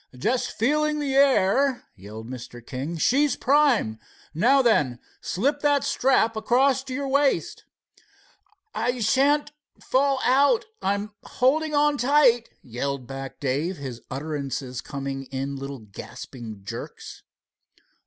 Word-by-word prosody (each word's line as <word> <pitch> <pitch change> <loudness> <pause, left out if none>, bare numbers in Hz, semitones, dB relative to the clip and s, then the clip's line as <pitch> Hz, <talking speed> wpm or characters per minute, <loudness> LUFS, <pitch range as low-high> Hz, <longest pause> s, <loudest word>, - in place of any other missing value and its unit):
"Just 245 - 0
feeling 300 +6 +1
the 285 -2 -2
air," 270 -1 +3
yelled 105 +4 -10
Mr. 120 -1 -9
King. 140 +7 -5
"She's 280 - +2
prime. 265 - +2 0.3
Now 260 - +4
then, 145 - +2 0.2
slip 280 +10 0
that 285 -1 +2
strap 230 -3 +2
across 260 +4 +2
your 275 +2 -3
waist." 280 +1 +1 1.1
"I 245 +1 -1
shan't 285 +7 +2 0.3
fall 275 0 +1
out. 285 - +3 0.2
I'm 200 +2 -1
holding 300 +4 +1
on 290 -1 +3
tight," 250 -2 +4
yelled 130 +2 -4
back 135 +1 -8
Dave, 145 +7 -1
his 130 -4 -7
utterance 135 -2 -4
coming 135 -1 -5
in 135 +1 -4
little 135 0 -6
gasping 110 0 -10
jerks. - - -8
225 Hz, 115 wpm, -25 LUFS, -, 1.1 s, Now